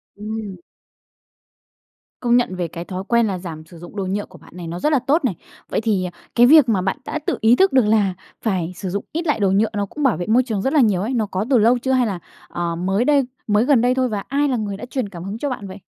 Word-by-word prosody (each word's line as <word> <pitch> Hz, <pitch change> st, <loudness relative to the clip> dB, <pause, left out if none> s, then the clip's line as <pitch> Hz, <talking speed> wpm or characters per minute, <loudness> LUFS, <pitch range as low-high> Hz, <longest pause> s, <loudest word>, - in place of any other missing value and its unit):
Ừm. 210 Hz, -2 st, -6 dB, 1.6 s
Công 240 Hz, -1 st, +3 dB
nhận 240 Hz, -7 st, 0 dB
về 175 Hz, -2 st, -2 dB
cái 170 Hz, +2 st, -7 dB
thói 185 Hz, 0 st, -5 dB
quen 235 Hz, -2 st, +3 dB
là 190 Hz, -, -2 dB
giảm 160 Hz, -3 st, -8 dB
sử 170 Hz, +1 st, -14 dB
dụng 175 Hz, +4 st, -12 dB
đồ 195 Hz, -, -2 dB
nhựa 200 Hz, +2 st, -2 dB
của 185 Hz, -, -16 dB
bạn -, -, -18 dB
này, 175 Hz, -2 st, -7 dB
nó 170 Hz, +2 st, -5 dB
rất 300 Hz, -, +1 dB
là 280 Hz, -, +4 dB
tốt 280 Hz, +5 st, +1 dB
này, 200 Hz, -9 st, 0 dB, 0.3 s
vậy -, -, -1 dB
thì, 205 Hz, -5 st, 0 dB
ờ, 180 Hz, -, -5 dB, 0.2 s
cái 240 Hz, 0 st, +7 dB
việc 295 Hz, -2 st, +7 dB
mà 195 Hz, -5 st, +2 dB
bạn 190 Hz, +8 st, -1 dB
đã 310 Hz, -, -3 dB
tự -, -, 0 dB
ý 225 Hz, +2 st, +5 dB
thức 385 Hz, +7 st, +3 dB
được 260 Hz, -4 st, +5 dB
là 210 Hz, -3 st, +2 dB, 0.3 s
phải 185 Hz, -5 st, -1 dB
sử 190 Hz, +1 st, -5 dB
dụng 200 Hz, +3 st, -3 dB
ít 330 Hz, +1 st, -3 dB
lại 295 Hz, -, +1 dB
đồ 195 Hz, -2 st, +2 dB
nhựa 205 Hz, +3 st, +2 dB
nó 205 Hz, -1 st, -1 dB
cũng 295 Hz, +9 st, -6 dB
bảo 260 Hz, -6 st, +3 dB
vệ 175 Hz, -, -4 dB
môi 240 Hz, +4 st, +4 dB
trường 220 Hz, -6 st, -2 dB
rất 265 Hz, -, -1 dB
là 305 Hz, -, +4 dB
nhiều 205 Hz, -6 st, +2 dB
ấy, 230 Hz, +6 st, -2 dB
nó 225 Hz, -3 st, +1 dB
có 195 Hz, +1 st, -3 dB
từ 260 Hz, -, +5 dB
lâu 235 Hz, +3 st, +4 dB
chưa 260 Hz, +2 st, -2 dB
hay 255 Hz, -2 st, +3 dB
là, 195 Hz, -4 st, -3 dB, 0.3 s
ờ, 170 Hz, -1 st, -3 dB
mới 190 Hz, +7 st, 0 dB
đây 285 Hz, -2 st, +3 dB, 0.2 s
mới 210 Hz, +2 st, +3 dB
gần 260 Hz, -4 st, +4 dB
đây 250 Hz, +1 st, +2 dB
thôi, 255 Hz, -1 st, +1 dB
và 205 Hz, -2 st, -3 dB
ai 285 Hz, +2 st, +1 dB
là 260 Hz, -3 st, 0 dB
người 205 Hz, -3 st, -3 dB
đã 210 Hz, -, -7 dB
truyền 250 Hz, -5 st, -3 dB
cảm 175 Hz, -3 st, -9 dB
hứng 195 Hz, +3 st, -5 dB
cho 285 Hz, +4 st, -2 dB
bạn 205 Hz, -6 st, -5 dB
vậy? 190 Hz, +1 st, -9 dB
215 Hz, 285 wpm, -21 LUFS, 190-250 Hz, 1.6 s, cái